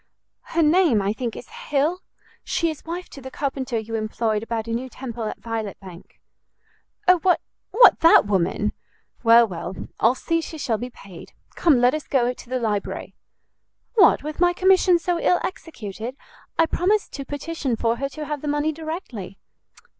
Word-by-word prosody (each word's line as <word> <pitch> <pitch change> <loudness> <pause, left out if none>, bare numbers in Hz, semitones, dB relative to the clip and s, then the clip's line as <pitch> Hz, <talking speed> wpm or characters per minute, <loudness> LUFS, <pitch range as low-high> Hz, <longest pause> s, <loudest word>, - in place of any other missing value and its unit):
"Her 335 - +5
name, 315 - +4
I 200 +1 0
think, 235 0 -4
is - - -10
Hill; 360 - -1 0.4
she 335 -1 0
is 310 - -10
wife 345 +2 -5
to 275 - -11
the 265 - -8
carpenter 265 -3 -3
you 220 +1 -5
employed 215 0 -1
about 225 -1 -3
a - - -4
new 255 +3 -3
temple 240 -3 -6
at 215 - -4
Violet 225 -3 -4
Bank." 185 -2 -13 0.9
"O, 365 -1 +6
what 360 +2 +3 0.3
what, 470 +1 +6
that 330 -8 +7
woman? 205 +2 0 0.5
Well, 230 0 +6
well, 180 0 -6 0.2
I'll 230 +3 +4
see 330 +4 -1
she 320 - -7
shall 230 -7 -1
be 245 - -5
paid. 195 -7 -13 0.2
Come, 300 -7 +3
let 245 +2 +4
us 305 -1 -4
go 250 -2 +1
to 245 - -14
the 255 0 -1
library." 210 -4 -3 0.8
"What, 410 - +5
with 305 +1 -6
my 350 0 +4
commission 370 -1 +4
so 345 0 -1
ill 355 +1 +3
executed? 245 - -6 0.4
I 330 - +5
promised 395 +6 0
to 275 - -5
petition 285 -2 -3
for 230 +1 0
her 275 +2 -2
to 300 +3 -7
have 295 -1 -4
the 300 - -5
money 295 +1 +1
directly." 310 - -7
265 Hz, 175 wpm, -23 LUFS, 225-330 Hz, 0.9 s, that